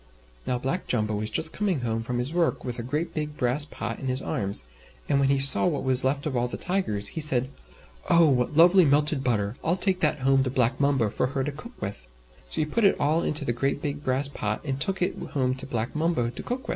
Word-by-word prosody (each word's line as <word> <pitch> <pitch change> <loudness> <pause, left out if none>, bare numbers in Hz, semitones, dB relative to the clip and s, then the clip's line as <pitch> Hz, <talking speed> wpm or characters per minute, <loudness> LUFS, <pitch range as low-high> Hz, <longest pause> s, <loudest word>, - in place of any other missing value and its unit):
Now 125 - 0
Black 135 +9 -3
Jumbo 110 -3 0
was 105 +1 -3
just 160 +7 +1
coming 190 -9 -1
home 115 -1 -2
from 120 +2 -4
his 125 +6 -3
work, 170 -1 0
with 125 -1 -4
a - - -2
great 150 +8 -3
big 150 -1 -4
brass 125 +4 0
pot - - -6
in 135 - -5
his 130 0 0
arms, 100 - -2 0.4
and 140 - +2
when 135 -1 +2
he 140 - +3
saw 135 +5 +7
what 150 -5 -2
was 130 -1 +4
left 140 +2 -1
of 145 -4 -3
all 120 0 0
the - - -6
Tigers, 140 - -1
he 160 - -5
said, 130 -3 +2 0.6
"Oh! 170 -1 +5
what 130 +1 0
lovely 175 +3 +7
melted 145 -1 +2
butter! 110 -2 -1
I'll 165 +2 +2
take 185 0 0
that 150 -2 +2
home 135 0 +3
to 130 - -2
Black 125 0 0
Mumbo 135 -7 +1
for - - -1
her 135 0 -2
to 150 - -3
cook 235 - -12
with." 95 -12 -6 0.4
So - - 0
he - - +1
put 225 +9 -1
it 200 - +3
all 155 +3 +2
into 150 -2 -1
the 120 - 0
great 135 +4 -1
big 145 0 -4
brass 130 +1 +1
pot, 110 -6 -3
and 135 -2 -3
took 190 +4 0
it - - -1 0.2
home 130 -3 0
to 130 +1 -5
Black 120 0 -3
Mumbo 155 -7 0
to 125 - -7
cook 250 +2 -4
with. - - -9
135 Hz, 250 wpm, -25 LUFS, 125-155 Hz, 0.6 s, saw